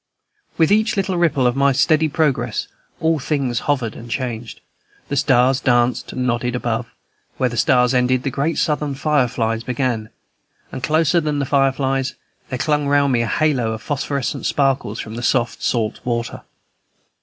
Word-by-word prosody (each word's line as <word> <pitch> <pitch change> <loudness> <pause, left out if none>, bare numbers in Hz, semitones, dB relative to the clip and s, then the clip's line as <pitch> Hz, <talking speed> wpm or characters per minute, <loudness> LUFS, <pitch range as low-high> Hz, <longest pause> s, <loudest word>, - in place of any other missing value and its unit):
With 160 +1 +3
each 215 0 +2
little 195 -1 0
ripple 165 -7 +2
of 120 0 +2
my 140 0 +3
steady 155 +4 +3
progress 150 -2 0 0.3
all 160 -1 +1
things 130 -4 -1
hovered 125 -6 0
and 120 - -10
changed; 120 -2 -4 0.5
the 140 - -1
stars 130 -1 +3
danced 120 -2 +1
and 125 - -3
nodded 120 0 -1
above; 120 -1 -2 0.5
where 130 - +1
the 120 - -6
stars 125 +2 +3
ended 125 0 +2
the 135 - -1
great 145 +5 -1
Southern 150 -2 0
fireflies 125 -6 0
began; 120 -3 -2 0.6
and - - -6
closer 160 +4 +2
than 150 -1 -1
the 140 - 0
fireflies, 135 -1 +1 0.3
there 130 - -3
clung 150 +2 0
round 140 -1 +3
me 120 - +2
a 115 - -1
halo 130 -6 +1
of 110 - -7
phosphorescent 140 -1 -2
sparkles 135 -6 0
from 110 - -6
the 120 - -5
soft 120 -1 0
salt 115 -3 -1
water. 120 -1 -3
130 Hz, 165 wpm, -20 LUFS, 120-145 Hz, 0.6 s, With